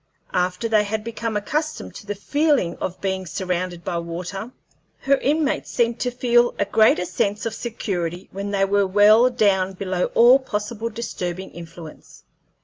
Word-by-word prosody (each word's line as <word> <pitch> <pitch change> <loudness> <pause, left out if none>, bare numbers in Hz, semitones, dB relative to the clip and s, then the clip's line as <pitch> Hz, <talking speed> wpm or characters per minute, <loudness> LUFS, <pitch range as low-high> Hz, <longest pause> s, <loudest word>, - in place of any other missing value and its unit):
After 180 +4 0
they 215 -2 +3
had 210 +1 -3
become 230 -1 -3
accustomed 305 +9 -3
to 205 - -11
the 205 - -3
feeling 285 - +1
of 185 - -4
being 190 -1 -2
surrounded 180 0 -3
by 170 0 -2
water, 180 +5 -5 0.5
her 275 +1 +3
inmates 295 +2 0
seemed 235 0 0
to 250 - 0
feel 240 -1 +2
a 200 - +1
greater 210 -3 +3
sense 200 +4 -1
of 225 - -2
security 185 -7 -4
when 200 +1 -5
they 195 -1 +2
were 200 0 +2
well 210 +5 +6
down 195 -6 +2
below 185 -1 -1
all 245 +3 +7
possible 225 -2 -4
disturbing 190 -5 -5
influence. 165 -2 -12
205 Hz, 155 wpm, -22 LUFS, 185-235 Hz, 0.5 s, all